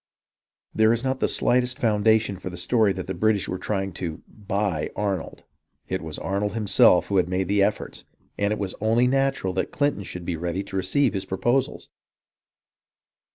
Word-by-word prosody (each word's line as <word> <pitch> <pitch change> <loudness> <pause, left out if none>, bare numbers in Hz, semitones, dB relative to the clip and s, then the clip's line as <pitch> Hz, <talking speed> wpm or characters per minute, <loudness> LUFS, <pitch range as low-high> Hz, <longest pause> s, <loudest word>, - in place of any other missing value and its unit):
There 110 0 +4
is 115 +1 0
not 130 0 -1
the - - +2
slightest 125 +1 +1
foundation 110 -3 +2
for 90 - -6
the 90 - -8
story 110 +3 +2
that 95 -1 -4
the 95 - -4
British 105 +2 +1
were 90 - -4
trying 95 -2 -2
to 80 -3 -5
" - - -44 0.2
buy 100 -7 -1
" - - -32
Arnold. 100 -4 -3 0.5
It - - -2
was - - -6
Arnold 100 +1 -2
himself 100 -4 +4
who 100 -2 +4
made 90 +1 -2
the 100 0 +3
offers, 105 +1 -2 0.3
and 100 0 0
it 105 - 0
was 95 -2 -3
only 115 +3 +3
natural 135 -7 +1
that 95 - -2
Clinton 145 -7 0
should 90 -2 -7
be 85 - -2
ready 85 +3 -3
to 100 -1 -9
receive 100 +8 +1
his 95 -2 -3
proposals. 120 +8 -1
100 Hz, 185 wpm, -24 LUFS, 95-110 Hz, 0.5 s, There